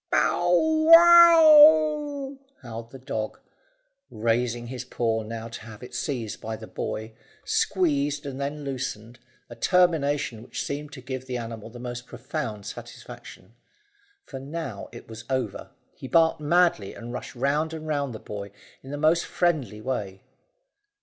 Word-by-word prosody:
"Pow 175 - +2 0.5
how!" 310 -4 +7 0.3
howled 115 -1 -8
the 135 - -11
dog, 110 -5 -5 0.7
raising 120 +2 -1
his 125 0 -6
paw 115 -3 -1
now 115 +1 -6
to 115 - -9
have 110 0 -12
it 125 - -11
seized 120 -8 -4
by 110 0 -4
the - - -10
boy, 110 +1 -5 0.3
squeezed 145 -5 0
and 140 -1 -6
then 145 +2 -4
loosened, 120 -4 -5 0.3
a 120 - -11
termination 145 - +1
which 120 - -5
seemed 145 +1 -5
to 135 - -9
give 130 0 -6
the 125 -1 -3
animal 115 -2 -7
the 120 - -12
most 120 0 -7
profound 120 -5 -5
satisfaction. 95 +4 -11 0.7
For 135 - -8
now 135 -6 -6
it 120 - -12
was 115 0 -10
over, 130 -1 -3 0.2
he 130 - -9
barked 165 +1 +3
madly 170 - +2
and 120 +1 -8
rushed 125 - -7
round 145 +5 0
and 160 -1 -7
round 140 -5 -2
the - - -7
boy 100 -1 -7 0.3
in 135 - -12
the 145 - -4
most 160 +3 +3
friendly 150 -12 -1
way. 100 -6 -4
130 Hz, 150 wpm, -25 LUFS, 115-155 Hz, 0.7 s, how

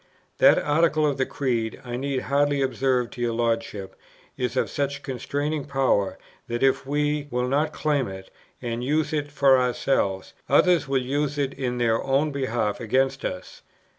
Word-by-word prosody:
That - - +7
Article 155 +1 +2
of 145 -2 0
the 130 - 0
Creed, 120 -5 -2
I 120 0 -4
need 135 0 -2
hardly 145 +1 +1
observe 130 -2 0
to 120 - -8
your 120 -1 0
Lordship, 115 -4 -2 0.4
is 125 0 -2
of - - +2
such 140 0 -3
constraining 145 +3 -3
power, 135 -8 +1 0.3
that, 120 +2 -2
if 135 0 +2
we 145 0 0
will 125 0 -1
not 145 +4 +1
claim 145 -5 0
it, 95 0 -9 0.3
and 120 0 -3
use 150 +3 0
it 145 -1 -2
for 135 -2 +5
ourselves, 120 -6 0 0.2
others 175 -6 +4
will 135 0 +1
use 145 +2 -1
it 140 -2 -1
in 125 -2 -3
their 115 -2 +1
own 140 +3 +1
behalf 120 -6 -1
against 130 +4 0
us. 90 - -6
135 Hz, 165 wpm, -25 LUFS, 120-145 Hz, 0.4 s, That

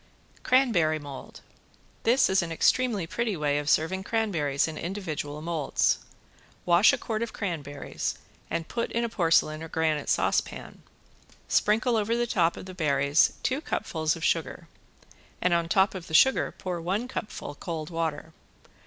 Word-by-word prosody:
~CRANBERRY 215 -12 +3
MOLD~ 145 -3 -10 0.6
This 250 +4 +4
is 190 0 +3
an 170 -1 -4
extremely 215 +2 +2
pretty 220 +2 -2
way 145 -1 +1
of 145 0 -3
serving 185 +6 +1
cranberries 170 -12 0
in 160 - -6
individual 155 -5 -5
molds. 160 -4 +1 0.7
Wash 175 +4 +6
a - - 0
quart 220 -1 -3
of 235 - -3
cranberries 150 -8 -4 0.3
and 165 0 -3
put 235 -1 -3
in 235 - 0
a 235 - -1
porcelain 165 -5 +2
or 160 - -6
granite 155 -2 -1
saucepan. - - -1 0.7
Sprinkle 225 +3 +2
over 220 +2 0
the 240 - +1
top 170 -7 +1
of - - -8
the 185 - -8
berries 140 -3 +2
two 265 +3 0
cupfuls 155 - -1
of 165 - -8
sugar - - -1 0.7
and 180 - +2
on 170 -1 +1
top 190 +2 +3
of 185 -3 -7
the 160 - -2
sugar 265 +11 +5
pour 180 -2 -4
one 195 +8 -1
cupful 210 - -6
cold 160 +1 -6
water. 160 -1 -3
170 Hz, 155 wpm, -27 LUFS, 155-210 Hz, 0.7 s, Wash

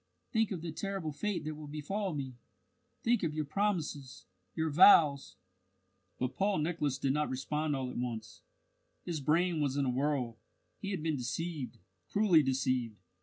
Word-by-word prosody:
"Think 220 -2 +2
of 180 -5 -4
the 170 - -3
terrible 190 -1 -3
fate 205 +6 -2
that 155 - -2
will 150 0 -9
befall 165 +5 -3
me! 135 -3 -4 0.7
Think 235 -1 +3
of 155 -3 -1
your 155 -1 -1
promises, 155 -6 -2 0.3
your 160 -1 0
vows!" 150 -4 +6 0.8
But 125 0 -2
Paul 195 0 +1
Nicholas 155 -4 0
did 135 -1 +1
not 150 +1 0
respond 150 +3 -1
all 130 -2 -3
at - - -5
once. 115 -3 -5 0.6
His 165 -4 -3
brain 165 +3 +2
was 140 -1 0
in 140 - +2
a 125 - +1
whirl. 130 -4 -1 0.4
He 195 - -4
had 185 -6 -3
been 160 -3 0
deceived, 150 +2 -4 0.3
cruelly 200 -6 +5
deceived! 130 -4 0
150 Hz, 165 wpm, -32 LUFS, 135-175 Hz, 0.8 s, vows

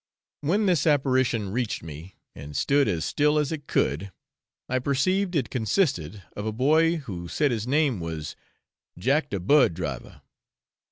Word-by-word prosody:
When 190 +9 +1
this 170 -6 +2
apparition 130 -8 +2
reached 115 -5 -2
me 80 +4 -10 0.2
and 70 0 -8
stood 140 - +3
as 85 -6 -1
still 150 +1 +2
as 150 -1 0
it 145 -3 -5
could, 80 +9 0 0.6
I 130 - 0
perceived 180 +9 0
it 135 -6 0
consisted 110 - 0
of 105 - -5
a - - 0
boy 155 +8 +3
who 95 - -6
said 145 - +1
his 115 -1 -2
name 140 -5 +2
was 80 -2 -5 0.6
'Jack 140 - +1
de 100 - -2
bird 105 - +4
driver.' 75 -8 -6
130 Hz, 155 wpm, -26 LUFS, 90-150 Hz, 0.6 s, bird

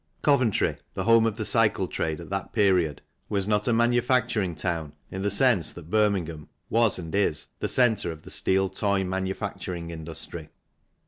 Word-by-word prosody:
Coventry, 130 -7 +2 0.2
the 95 - -2
home 115 +1 +5
of 110 -1 -3
the 110 - -2
cycle 110 -5 +3
trade 80 -2 -3
at 85 - -10
that 95 0 -4
period, 90 -8 +2 0.3
was 100 -2 -1
not 105 -1 +1
a - - +3
manufacturing 120 - +2
town 80 -2 -3 0.2
in 95 - -4
the 100 - +1
sense 100 - +3
that 85 -1 -12
Birmingham 95 -8 0 0.2
was 115 -2 +3
and 85 -3 -7
is 100 -7 0
the - - -2
centre 110 -8 +2
of 80 -1 -11
the - - -10
steel 95 0 +1
toy 100 0 0
manufacturing 95 -2 -4
industry. 80 0 -7
95 Hz, 170 wpm, -26 LUFS, 85-110 Hz, 0.3 s, home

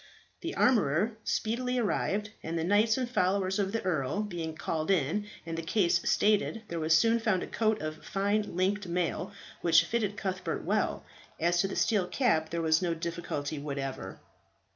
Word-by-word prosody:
The 340 - -5
armourer 210 - +3
speedily 250 +3 -1
arrived, 210 -2 0
and 165 +1 -3
the 160 - -1
knights 210 +6 +3
and 255 -2 -1
followers 190 -3 +1
of 195 -1 0
the 225 - -2
earl 170 +1 0
being 170 -6 -4
called 160 +1 -3
in 195 +3 +1 0.2
and 165 0 -4
the 165 - -3
case 170 +1 +2
stated, 215 +1 +2
there 170 - -3
was 160 0 +4
soon 230 +5 +3
found 215 -5 +1
a - - -3
coat 220 -1 +1
of 155 0 -5
fine 205 0 -1
linked 190 +2 0
mail, 180 +2 -1 0.3
which 165 -1 +5
fitted 210 -3 -1
Cuthbert 190 -1 -3
well. - - 0 0.4
As 175 +1 +3
to 195 - 0
the 195 - -5
steel 205 -5 +2
cap, 175 -7 +1
there 170 0 -2
was 160 +1 +3
no 170 -2 0
difficulty 160 -3 -4
whatever. 135 -8 -5
185 Hz, 175 wpm, -30 LUFS, 165-210 Hz, 0.4 s, which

